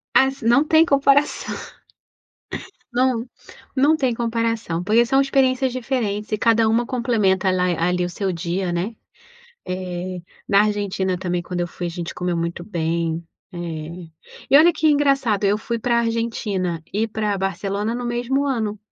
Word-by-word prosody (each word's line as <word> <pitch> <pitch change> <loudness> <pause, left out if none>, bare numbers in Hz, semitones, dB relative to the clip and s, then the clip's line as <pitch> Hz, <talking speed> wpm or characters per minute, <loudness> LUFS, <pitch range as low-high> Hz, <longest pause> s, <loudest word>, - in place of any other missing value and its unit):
Assi 265 -3 +3
não 240 +5 +5
tem 320 +1 +5
comparação. 280 0 +2 1.4
Não, 245 -1 +1 0.5
não 285 +4 +4
tem 260 -5 0
comparação, 230 -6 -1
porque 220 +5 +4
são 270 +3 +3
experiências 265 -1 +2
diferentes 230 -5 -2
e 215 - +1
cada 230 0 +3
uma 235 +2 +2
complementa 220 -7 +1
ala 185 -1 +2 0.2
ali 180 +1 +1
o 175 - -3
seu 190 +2 -2
dia, 175 +1 -2
né. 185 +7 -2 0.7
Eh, 180 0 -4 0.3
na 200 0 +5
Argentina 200 -3 -1
também 180 -1 -2
quando 175 0 -4
eu 175 - 0
fui 175 0 -6
a - - -3
gente 170 -1 -6
comeu 180 -1 -2
muito 170 +1 -3
bem, 165 -2 -2 0.3
eh, 170 0 -6 0.4
e 275 - +8
olha 335 +3 +6
que 315 - +2
engraçado 275 -8 +2
eu 200 +1 +3
fui 230 +2 -3
para 235 +1 +1
a - - +4
Argentina 220 -7 -2
e 220 +3 0
para 215 -2 -1
Barcelona 200 +3 -2
no 245 0 -4
mesmo 240 +3 0
ano. 220 -6 -1
215 Hz, 160 wpm, -22 LUFS, 180-245 Hz, 1.4 s, e